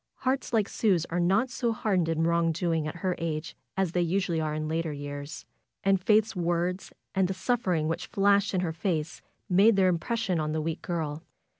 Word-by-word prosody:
Hearts 260 +1 0
like 220 -4 +2
Sue's 185 -7 +1
are 175 - 0
not 195 +9 +2
so 240 -2 0
hardened 190 -6 0
in 165 0 +1
wrong 170 0 +2
doing 165 -2 -1
at 155 - -5
her 185 - +2
age 165 0 -3 0.2
as 190 -3 +1
they 180 - +1
usually 175 -1 0
are 155 -1 -2
in 155 0 -2
later 160 0 -1
years. 145 +1 -6 0.4
And 195 -1 +3
Faith's 215 +2 +3
words 175 +1 -1 0.2
and 190 -1 +2
the 190 - -3
suffering 185 -7 0
which 165 - -3
flashed 200 0 +2
into 185 - +1
her 160 - -2
face 165 -2 -2 0.3
made 200 +3 +5
their 190 -1 +4
impression 190 +1 -1
on 155 0 -1
the 160 - 0
weak 165 +1 -3
girl. 160 -3 -3
175 Hz, 195 wpm, -28 LUFS, 160-195 Hz, 0.4 s, made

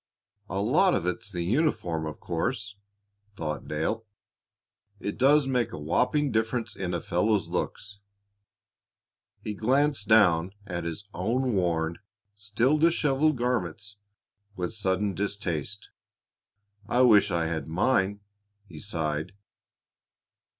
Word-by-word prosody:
"A 95 - -2
lot 150 - +3
of 85 - -1
it's 95 +5 -3
the 90 -3 -3
uniform, 90 - 0
of 75 - -7
course," 100 +4 -3 0.6
thought 75 -5 -4
Dale. 80 +9 -2 1.0
"It 100 - -4
does 140 +3 +4
make 125 -4 0
a - - -6
whopping 125 - +1
difference 110 +1 -1
in 90 -2 -3
a - - -1
fellow's 100 +5 0
looks." 100 0 -4 1.4
He 105 - -3
glanced 130 +1 +1
down 90 -4 +4
at 90 -4 -4
his 85 +4 -4
own 120 +7 0
worn, 85 -3 0 0.3
still 110 +8 +1
disheveled 155 -3 +3
garments 105 -4 -2 0.6
with 90 +1 -3
sudden 100 -1 0
distaste. 100 -2 -3 1.0
"I 125 - +3
wish 110 -5 +6
I 85 -1 0
had 80 -1 -3
mine!" 100 +3 +1 0.4
he 80 -6 -11
sighed. 80 -3 -3
100 Hz, 115 wpm, -27 LUFS, 85-120 Hz, 1.4 s, wish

